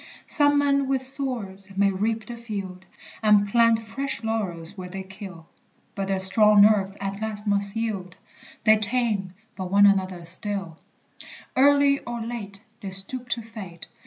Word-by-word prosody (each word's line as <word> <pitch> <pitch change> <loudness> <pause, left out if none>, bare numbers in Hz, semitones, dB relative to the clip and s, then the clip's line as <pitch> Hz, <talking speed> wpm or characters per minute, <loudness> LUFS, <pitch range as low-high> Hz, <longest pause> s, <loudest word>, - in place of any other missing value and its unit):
Some 290 -2 +3
men 280 -1 +2
with 265 -1 0
swords 225 -8 0
may 200 0 +3
reap 220 +3 -2
the 240 - -8
field, 195 -5 -7 0.4
And 210 -2 +4
plant 230 +1 +3
fresh 225 +2 -1
laurels 195 -6 -3
where 185 -2 -8
they 190 +1 -6
kill; 190 -3 -11 0.5
But 195 -1 -4
their 195 -1 -1
strong 210 +2 +5
nerves 200 -2 +2
at 195 +1 -5
last 215 -1 -4
must 200 0 0
yield; 200 -6 -4 0.5
They 215 0 +5
tame 210 -4 -1 0.2
but 185 -2 -6
one 200 +1 +5
another 185 -3 +1
still: 185 -1 -1 0.8
Early 280 +1 +4
or 240 0 -6
late, 220 -3 -4 0.2
They 200 - -6
stoop 240 +7 +2
to 230 -1 -2
fate. 200 -7 -10
205 Hz, 155 wpm, -24 LUFS, 190-230 Hz, 0.8 s, strong